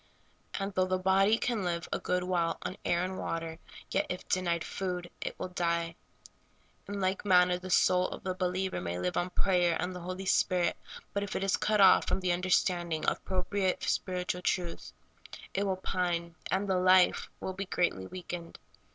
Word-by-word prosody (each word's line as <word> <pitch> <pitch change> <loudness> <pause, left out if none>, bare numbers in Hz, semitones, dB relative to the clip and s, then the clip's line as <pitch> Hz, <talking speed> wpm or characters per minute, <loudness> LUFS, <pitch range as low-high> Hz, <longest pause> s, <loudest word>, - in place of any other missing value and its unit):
And 195 +1 -3
though 185 0 +2
the 185 0 +1
body 195 +3 +4
can 235 -4 -1
live 170 -1 -2
a - - 0
good 180 0 0
while 175 -2 0
on - - -4
air 175 +1 +1
and 185 +1 -3
water, 165 0 -4 0.3
yet, - - +1
if 180 - -5
denied 170 -2 0
food, 180 -2 -4
it - - -4
will 185 - -4
die. 170 -2 -1 0.9
In 205 0 -4
like 190 0 0
manner 180 -2 +4
the 185 +1 -8
soul 180 0 +4
of - - -8
the 185 - -1
believer 185 +1 -1
may 85 0 -3
live 90 0 -2
on 175 - 0
prayer 180 -2 +2
and 180 +1 -2
the - - -5
Holy 185 +2 -5
Spirit, 180 -2 +2 0.4
but 200 - 0
if 200 0 -4
it - - -1
is 195 - +2
cut 210 -1 +2
off 195 - +7
from - - +1
the 185 -1 +1
understanding 175 -2 +1
of - - +2
appropriate 190 0 -1
spiritual 180 -1 -1
truth, 175 -2 -2 0.6
it 200 +1 0
will 190 - +1
pine, 175 -2 -1 0.2
and 195 +2 0
the 190 -1 +2
life 185 0 +4 0.3
be 195 +1 -3
greatly 175 - 0
weakened. 175 - -7
180 Hz, 185 wpm, -31 LUFS, 175-190 Hz, 0.9 s, off